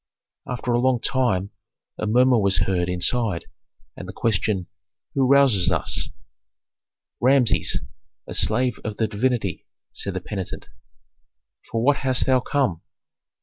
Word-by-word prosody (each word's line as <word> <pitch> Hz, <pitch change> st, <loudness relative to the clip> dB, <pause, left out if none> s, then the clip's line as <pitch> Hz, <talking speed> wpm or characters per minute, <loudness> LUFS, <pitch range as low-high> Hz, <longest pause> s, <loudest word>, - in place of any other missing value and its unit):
After 125 Hz, 0 st, -3 dB
a 120 Hz, -, +3 dB
long 130 Hz, -1 st, +2 dB
time 105 Hz, -8 st, 0 dB, 0.5 s
a -, -, -2 dB
murmur 125 Hz, +2 st, +4 dB
was 100 Hz, -3 st, +2 dB
heard 90 Hz, -2 st, 0 dB
inside, 95 Hz, +1 st, 0 dB, 0.5 s
and -, -, -8 dB
the -, -, -7 dB
question, 105 Hz, -3 st, 0 dB, 0.5 s
"Who 135 Hz, -2 st, +2 dB
rouses 135 Hz, -9 st, +4 dB
us?" -, -, 0 dB, 1.1 s
"Rameses, 130 Hz, -2 st, +3 dB, 0.5 s
a -, -, -7 dB
slave 125 Hz, -2 st, +1 dB
of 105 Hz, -1 st, -5 dB
the 110 Hz, -, +1 dB
divinity," 110 Hz, -3 st, -1 dB, 0.3 s
said 100 Hz, -2 st, -3 dB
the -, -, -1 dB
penitent. 95 Hz, -1 st, -6 dB, 1.0 s
"For 115 Hz, 0 st, -1 dB
what 140 Hz, +2 st, +4 dB
hast 130 Hz, -2 st, +1 dB
thou 130 Hz, -1 st, +3 dB
come?" 125 Hz, -, -1 dB
115 Hz, 130 wpm, -23 LUFS, 100-130 Hz, 1.1 s, murmur